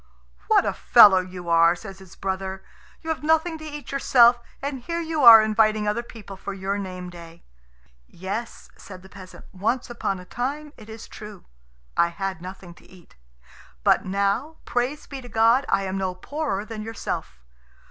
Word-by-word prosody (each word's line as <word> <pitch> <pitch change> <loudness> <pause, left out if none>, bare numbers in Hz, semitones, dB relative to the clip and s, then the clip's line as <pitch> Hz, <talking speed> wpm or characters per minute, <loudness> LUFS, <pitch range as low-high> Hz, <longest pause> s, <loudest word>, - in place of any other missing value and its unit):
"What - - +4
a - - 0
fellow 190 -2 +7
you 180 -1 -8
are!" 165 0 +4
says 195 0 -11
his 190 -1 -15
brother; 190 0 -4 0.4
"you 320 - -6
have 320 - -4
nothing 320 +1 +1
to - - -10
eat 295 -2 -8
yourself, 245 -3 +5 0.2
and 275 -1 -4
here 335 +7 -4
you 320 -3 -2
are 225 -2 +10
inviting 215 -1 +2
other 210 +3 0
people 225 -4 -11
for 195 +1 -7
your 195 +1 -3
name 185 -2 -7
day." 170 -1 -13 0.6
"Yes," 200 - -7
said 185 -2 -12
the 190 - -15
peasant, 190 -2 -13
"once 230 +7 -2
upon 195 -5 -3
a 180 - -12
time, 285 +8 -4
it 215 -1 -15
is 220 0 -10
true, 210 -3 -11 0.5
I 170 - +3
had 185 0 -5
nothing 185 -1 -10
to - - -22
eat; 180 -3 -19 0.7
but - - +3
now, 200 +11 -1
praise 255 +5 -2
be 275 -2 -8
to 245 - -12
God, 230 +4 +3
I 195 - +1
am 190 0 -3
no 185 -1 -2
poorer 245 -1 -4
than 220 -1 -7
yourself. 220 - -5
210 Hz, 180 wpm, -24 LUFS, 190-245 Hz, 0.7 s, are